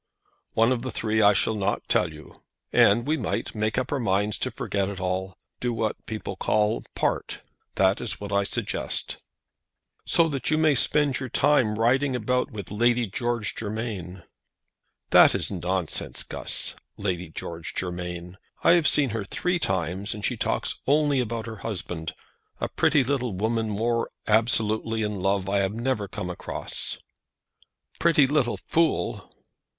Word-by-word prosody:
"One 115 +2 +4
of 125 -2 0
the 130 - -4
three 110 -2 0
I 105 0 +7
shall 105 - +1
not 100 -1 -1
tell - - +2
you. - - -14 0.3
And 115 +4 +5
we 155 +2 +1
might - - -2
make 110 +1 -1
up 130 0 -1
our 145 - 0
minds 105 -2 0
to - - 0
forget 100 -1 -2
it 100 -2 -6
all. 95 0 -2 0.2
Do 125 - -1
what 110 -2 -1
the - - -40
people 110 -3 -5
call, 105 +3 +1
part. - - -1 0.3
That 95 +1 +3
is 120 - -3
what 100 0 -6
I 100 0 +3
suggest." - - -2 0.9
"So 170 - +4
that 135 -3 -2
you 155 - +3
may 155 -1 +4
spend 140 +1 +3
your 130 -2 -5
time 145 -1 +3
in 105 - -2
riding 130 +4 +2
about 125 +3 0
with 105 -8 -7
Lady 120 +3 +2
George 120 +2 -2
Germain." 105 -5 -5 0.9
"That - - +8
is - - -1
nonsense, 90 -2 -2
Guss. - - -3 0.2
Lady 90 -4 -2
George - - -6
Germain 90 0 -5 0.2
I - - +6
have 170 -3 +5
seen 140 -5 +4 0.2
three 180 0 0
times, 95 - -1
and 105 -1 -4
she - - 0
talks - - -1
only 145 -1 +3
about 115 -2 -2
her 115 -1 -7
husband; 90 -7 -4 0.4
a - - -2
pretty 145 - +3
little 125 -4 -1
woman 110 +3 0
more 115 +3 0 0.2
absolutely 110 0 +2
in 105 -3 -2
love 95 0 +1
I 100 0 +2
never 110 0 -2
came 90 -1 -5
across." 90 - -5 1.0
"Pretty 165 -4 +5
little 135 -3 +1
fool!" 165 0 0
110 Hz, 160 wpm, -26 LUFS, 100-125 Hz, 1.0 s, That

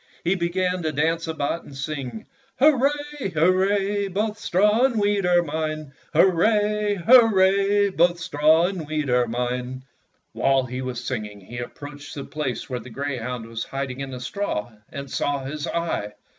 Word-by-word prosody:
He 175 - +2
began 180 0 0
to 160 -2 -1
dance 165 +3 0
about 160 +1 -2
and 135 - -11
sing: 145 - -5 0.2
— 270 - -36
"Hurrah, 275 -1 +5 0.5
hurrah! 195 +4 +2
Both 210 +3 -2
straw 210 +6 +3
and 240 -5 +1
wheat 205 -2 +1
are 175 -1 +4
mine! 155 -2 -4 0.2
Hurrah, 205 +5 +3
hurrah! 200 -4 +5
Both 175 0 +3
straw 160 -1 +3
and 180 -5 -3
wheat 150 -3 -1
are 125 -1 +3
mine! 125 +2 -3 0.3
" - - -46
While 135 -1 +2
he 125 +1 -5
was 125 -1 -4
singing 105 -5 -4
he 120 +6 -8
approached 145 +4 -8
the 140 - -5
place 150 -5 -4
where 125 -1 -3
the 120 +2 -11
greyhound 125 -2 -4
was 115 0 -5
hiding 135 -1 -4
in 135 -1 -4
the 130 -1 -6
straw, 125 - -3 0.2
and 140 0 -7
saw 140 0 -1
his 150 +3 -4
eye. 165 -11 -2
155 Hz, 165 wpm, -24 LUFS, 130-195 Hz, 0.5 s, Hurrah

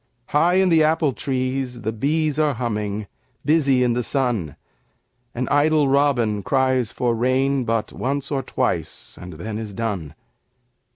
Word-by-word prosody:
High 170 +5 +3
in 190 0 +4
the 165 -2 +5
apple 155 -2 +2
trees 130 -1 -3
the 110 - -1
bees 150 +6 0
Are 150 -3 +2
humming, 105 -3 -3 0.4
busy 140 -4 +3
in 120 -1 +2
the 125 - 0
sun, 120 - -1 0.8
An 125 +1 -2
idle 150 0 +3
robin 130 -7 +2
cries 130 -2 +1
for 120 -2 0
rain 130 +3 +1
But 115 -1 -1
once 140 +2 -3
or 135 -2 0
twice - - -3
and 90 0 -8
then 105 +7 -5
is 105 -3 -7
done. 95 -10 -3
130 Hz, 150 wpm, -22 LUFS, 110-145 Hz, 0.8 s, the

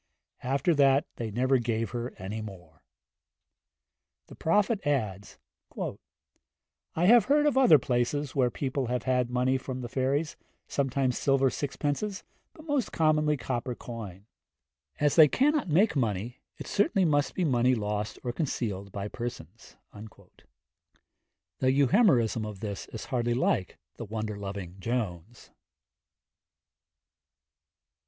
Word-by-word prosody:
After 140 +6 +1
that 140 +1 +4
they 115 -2 -3
never 130 +4 +2
gave 115 -1 -2
her 120 0 -5
any 105 +4 -5
more. 90 -7 -11 1.5
The - - -11
Prophet 205 +6 +1
adds: 105 -9 -2 0.4
'I - - -3 1.1
have 230 +1 +7
heard 295 +2 +3
of 295 - +2
other 255 - +7
places 130 +2 -1
where 130 -3 +3
people 130 0 -3
have 125 -1 -2
had 125 -2 +1
money 125 +1 +1
from 130 -1 -6
the 120 - -5
fairies, 135 +5 -1 0.3
sometimes 135 -2 0
silver 135 -1 +2
sixpences, 145 +8 -3 0.3
but 310 - -14
most 290 -7 -1
commonly 150 -1 +2
copper 125 0 -3
coin. 105 -6 -8 0.7
As 145 -1 +2
they 155 -2 +9
cannot 280 - +1
make 190 +7 +3
money, 115 -1 -2 0.2
it - - -8
certainly 200 -2 +2
must 145 -3 +1
be 180 - 0
money 125 -2 +3
lost 105 0 -3
or 120 - -3
concealed 105 - -3
by 100 +1 -4
persons.' 120 +2 -8 0.2
The 110 +4 -9
Euhemerism 135 - +3
of 105 -2 -6
this 100 -3 -5
is 110 - -8
hardly 120 -2 -1
like 95 -7 0 0.2
the 115 - -6
wonder 110 0 -4
loving 100 -2 -7
Jones. 110 -2 -4
125 Hz, 125 wpm, -28 LUFS, 110-145 Hz, 1.5 s, they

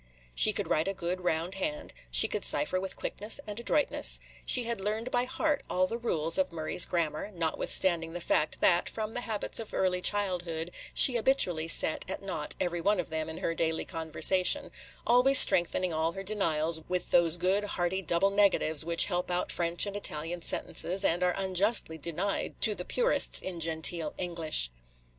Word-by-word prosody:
She - - +4
could - - -5
write 155 +3 -1
a 195 - -3
good, 185 0 -5
round 170 +1 -2
hand; 300 +10 -5 0.2
she - - +4
could - - -4
cipher 185 -11 +2
with 190 0 -6
quickness 210 +6 -2
and 210 +1 -5
adroitness; 285 +5 +3 0.3
she 250 - +2
had 235 -3 -3
learned 220 +5 -4
by 245 0 0
heart 295 +3 -2
all 185 0 0
the 230 +5 -5
rules 165 -7 0
of 185 -1 -1
Murray's 160 +1 +2
Grammar, 165 +1 -3
notwithstanding 170 -1 -1
the 175 - -6
fact 155 -2 -1
that, 175 -1 +3
from 220 0 -6
the 245 - -3
habits 220 -2 -3
of 225 - -8
early 180 -1 -1
childhood, 180 -5 0 0.2
she 250 -3 +7
habitually 185 -10 +1
set 160 - +5
at 190 - -5
naught 165 -6 -5
every 175 -1 -3
one 205 +2 0
of 170 - -5
them 160 0 -4
in 160 - -7
her 165 - -3
daily 160 -1 -2
conversation, 185 - +1 0.2
– - - -23
always 250 +3 +5
strengthening 175 -2 +6
all 160 +1 -2
her 195 - -8
denials 165 -6 -1
with 180 0 -3
those 170 -1 +3
good, 190 +4 -1
hearty 190 -2 -3
double 180 +3 0
negatives 195 -7 +1
which 170 +1 +1
help 180 -2 -4
out 180 0 -3
French 170 +1 0
and 200 0 -7
Italian 170 -3 -4
sentences, 190 +3 -2
and 170 +2 0
are 180 -1 0
unjustly 190 -3 -1
denied 170 +6 -4
to 215 - +4
the 180 -3 -6
purists - - +2
in 180 -2 -7
genteel 160 0 0
English. 165 - 0
180 Hz, 185 wpm, -28 LUFS, 165-205 Hz, 0.3 s, she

